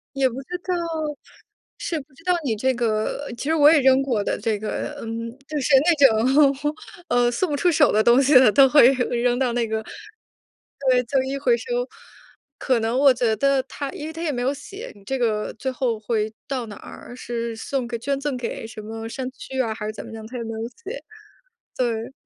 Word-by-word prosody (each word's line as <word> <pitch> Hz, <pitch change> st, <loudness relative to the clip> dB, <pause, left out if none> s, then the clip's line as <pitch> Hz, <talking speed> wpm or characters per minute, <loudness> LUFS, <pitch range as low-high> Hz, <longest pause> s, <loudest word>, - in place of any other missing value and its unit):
也 270 Hz, -1 st, +3 dB
不 250 Hz, -, -5 dB
知 360 Hz, +6 st, -5 dB
道 365 Hz, -, +1 dB, 1.0 s
是 325 Hz, -3 st, -3 dB
不 275 Hz, +1 st, -22 dB
知 305 Hz, +5 st, -19 dB
道 360 Hz, -1 st, +2 dB
你 230 Hz, -5 st, 0 dB
这 260 Hz, +4 st, +1 dB
个 235 Hz, +4 st, -1 dB
其 -, -, -5 dB
实 320 Hz, -, +3 dB
我 300 Hz, 0 st, +7 dB
也 310 Hz, -, +5 dB
扔 265 Hz, +1 st, +4 dB
过 235 Hz, -7 st, 0 dB
的 -, -, -1 dB
这 215 Hz, -2 st, -1 dB
个， 215 Hz, +6 st, -4 dB
嗯， 230 Hz, 0 st, -5 dB, 0.2 s
就 300 Hz, -1 st, -3 dB
是 275 Hz, +2 st, 0 dB
那 335 Hz, +3 st, +3 dB, 0.6 s
种， 295 Hz, +2 st, -3 dB, 0.3 s
呃， 245 Hz, -2 st, +2 dB
送 335 Hz, +8 st, -1 dB
不 290 Hz, -, 0 dB
出 355 Hz, +4 st, +3 dB
手 300 Hz, -2 st, +4 dB
的 215 Hz, +1 st, +3 dB
东 240 Hz, +4 st, +5 dB
西 280 Hz, +1 st, +3 dB
的， 255 Hz, -4 st, +8 dB
都 270 Hz, +3 st, +6 dB
会 285 Hz, -4 st, +7 dB
扔 245 Hz, -1 st, 0 dB
到 255 Hz, -3 st, +1 dB
那 235 Hz, -1 st, 0 dB
个， 220 Hz, 0 st, -2 dB, 1.1 s
对 250 Hz, -1 st, +4 dB
旧 265 Hz, +2 st, +1 dB
衣 270 Hz, +1 st, -3 dB
回 475 Hz, -, +3 dB
收。 485 Hz, +1 st, -3 dB, 0.7 s
可 255 Hz, -3 st, +1 dB
能 225 Hz, +3 st, -1 dB
我 275 Hz, -1 st, +6 dB
觉 235 Hz, -3 st, +1 dB
得 275 Hz, 0 st, +2 dB
它 275 Hz, +1 st, -6 dB
因 295 Hz, -, -7 dB
为 320 Hz, -, -7 dB
它 325 Hz, -, -7 dB
也 320 Hz, -3 st, -1 dB
没 245 Hz, -, -3 dB
有 270 Hz, -, +1 dB
写 395 Hz, -, -9 dB
你 200 Hz, -, -18 dB
这 265 Hz, +6 st, -2 dB
个 220 Hz, -3 st, 0 dB
最 260 Hz, +3 st, -3 dB
后 245 Hz, -4 st, -1 dB
会 215 Hz, -1 st, -1 dB, 0.2 s
到 260 Hz, -4 st, -3 dB
哪 205 Hz, -, -9 dB
儿。 245 Hz, -, -11 dB
是 235 Hz, -2 st, -4 dB
送 255 Hz, +2 st, -3 dB
给 235 Hz, -, -3 dB
捐 275 Hz, +3 st, -2 dB
赠 280 Hz, -3 st, -2 dB
给 230 Hz, -2 st, -5 dB
什 220 Hz, -1 st, -9 dB
么 225 Hz, +1 st, -6 dB
山 260 Hz, +2 st, -4 dB
区 265 Hz, 0 st, -7 dB
啊， 225 Hz, -3 st, -1 dB
还 210 Hz, -1 st, -6 dB
是 -, -, -2 dB
怎 -, -, -8 dB
么 -, -, -10 dB
样？ 220 Hz, -1 st, -8 dB
它 245 Hz, +2 st, -7 dB
也 235 Hz, -, -4 dB
没 225 Hz, -, -7 dB
有 225 Hz, +1 st, -4 dB
写 400 Hz, -, -9 dB, 0.7 s
对。 235 Hz, -1 st, -2 dB
255 Hz, 240 characters per minute, -23 LUFS, 230-280 Hz, 1.1 s, 的